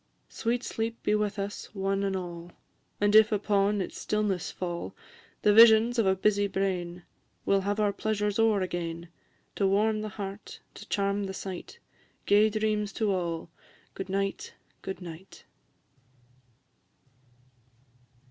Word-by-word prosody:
Sweet 235 Hz, +2 st, -1 dB
sleep 225 Hz, +1 st, -4 dB
be -, -, +2 dB
with 210 Hz, 0 st, 0 dB
us, 200 Hz, +1 st, -4 dB
one 195 Hz, 0 st, 0 dB
and 195 Hz, -1 st, 0 dB
all! 175 Hz, -2 st, -6 dB, 0.5 s
And 205 Hz, +1 st, +3 dB
if 220 Hz, 0 st, +7 dB
upon 205 Hz, -1 st, +1 dB
its 185 Hz, -, -5 dB
stillness 210 Hz, -4 st, -1 dB
fall 175 Hz, -2 st, -5 dB, 0.5 s
The 210 Hz, -, +5 dB
visions 230 Hz, +2 st, +7 dB
of 215 Hz, -, +3 dB
a 190 Hz, -, +4 dB
busy 205 Hz, +1 st, +2 dB
brain, 180 Hz, -3 st, -2 dB, 0.4 s
We -, -, +2 dB
'll 195 Hz, -, +3 dB
have 205 Hz, +2 st, -1 dB
our 205 Hz, -1 st, +2 dB
pleasure 210 Hz, -1 st, -1 dB
o'er 220 Hz, -3 st, +3 dB
again; 170 Hz, -2 st, -4 dB, 0.5 s
To 200 Hz, -, +2 dB
warm 215 Hz, +2 st, +2 dB
the 215 Hz, -, -4 dB
heart, 200 Hz, 0 st, -7 dB
to -, -, -12 dB
charm 200 Hz, 0 st, 0 dB
the 190 Hz, 0 st, -5 dB
sight, 190 Hz, -, -7 dB, 0.5 s
Gay 210 Hz, +2 st, +5 dB
dreams 215 Hz, -1 st, -1 dB
to 215 Hz, -3 st, 0 dB
all! 170 Hz, -3 st, -3 dB, 0.4 s
Good 195 Hz, 0 st, -6 dB
night, 195 Hz, 0 st, -2 dB, 0.3 s
good 190 Hz, 0 st, -6 dB
night! 170 Hz, +2 st, -11 dB
200 Hz, 140 wpm, -28 LUFS, 190-215 Hz, 0.5 s, if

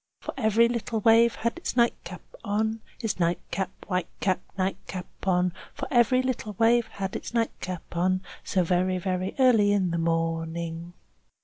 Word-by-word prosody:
Chorus -, -, -6 dB
For 260 Hz, -, -6 dB
every 220 Hz, +2 st, +5 dB
little 230 Hz, -1 st, -2 dB
wave 230 Hz, +2 st, +5 dB
has 235 Hz, +1 st, 0 dB
its 340 Hz, -, -4 dB
nightcap 210 Hz, -7 st, 0 dB, 0.2 s
on, 220 Hz, +1 st, -1 dB, 0.2 s
Its 220 Hz, -4 st, -2 dB
nightcap, 175 Hz, +2 st, -1 dB, 0.2 s
white 180 Hz, -3 st, -1 dB
cap, 185 Hz, -2 st, +1 dB, 0.2 s
nightcap 185 Hz, -1 st, -3 dB, 0.2 s
on. 180 Hz, -1 st, +2 dB, 0.2 s
For -, -, -4 dB
every 255 Hz, +1 st, +4 dB
little 245 Hz, -4 st, -2 dB
wave 230 Hz, 0 st, +4 dB
has 195 Hz, -1 st, -3 dB
its -, -, -6 dB
nightcap 185 Hz, -6 st, -2 dB
on, 185 Hz, +2 st, +1 dB, 0.2 s
So 185 Hz, -, +1 dB
very, 185 Hz, +2 st, +1 dB
very 185 Hz, 0 st, -2 dB
early 235 Hz, -6 st, +5 dB
in 190 Hz, -4 st, +2 dB
the 170 Hz, -, -1 dB
morning. 165 Hz, +1 st, -2 dB
190 Hz, 155 wpm, -27 LUFS, 180-230 Hz, 0.2 s, every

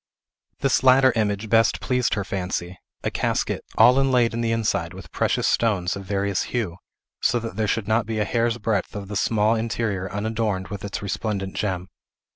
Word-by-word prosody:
This 135 Hz, -, +2 dB
latter 130 Hz, 0 st, +6 dB
image 105 Hz, -1 st, 0 dB
best 115 Hz, 0 st, +3 dB
pleased 125 Hz, -3 st, 0 dB
her 100 Hz, -, -1 dB
fancy; 90 Hz, -2 st, -4 dB, 0.2 s
a -, -, -1 dB
casket, -, -, -1 dB
all 125 Hz, +2 st, +7 dB
inlaid 125 Hz, -4 st, +3 dB
in 115 Hz, -, -2 dB
the 115 Hz, -1 st, 0 dB
inside 100 Hz, -6 st, -1 dB
with 90 Hz, -4 st, -11 dB
precious -, -, +1 dB
stones 100 Hz, -6 st, +1 dB
of 100 Hz, -1 st, -7 dB
various 100 Hz, 0 st, 0 dB, 0.2 s
hue, 95 Hz, -8 st, -2 dB, 0.4 s
so -, -, +2 dB
that 115 Hz, -3 st, -5 dB
there 110 Hz, 0 st, 0 dB
Should 105 Hz, 0 st, -1 dB
not 110 Hz, 0 st, +1 dB
be 110 Hz, -1 st, -2 dB
a 105 Hz, -, +1 dB
hair's 115 Hz, +1 st, 0 dB
breadth 105 Hz, -3 st, -1 dB
of 100 Hz, -1 st, -6 dB
the 105 Hz, -, -5 dB
small 110 Hz, +2 st, +2 dB
interior 110 Hz, -4 st, -2 dB
unadorned 105 Hz, -2 st, -2 dB
with 100 Hz, -2 st, -6 dB
its 100 Hz, 0 st, -4 dB
resplendent 100 Hz, -1 st, -3 dB
gem. 95 Hz, -3 st, -2 dB
105 Hz, 185 wpm, -24 LUFS, 100-115 Hz, 0.4 s, all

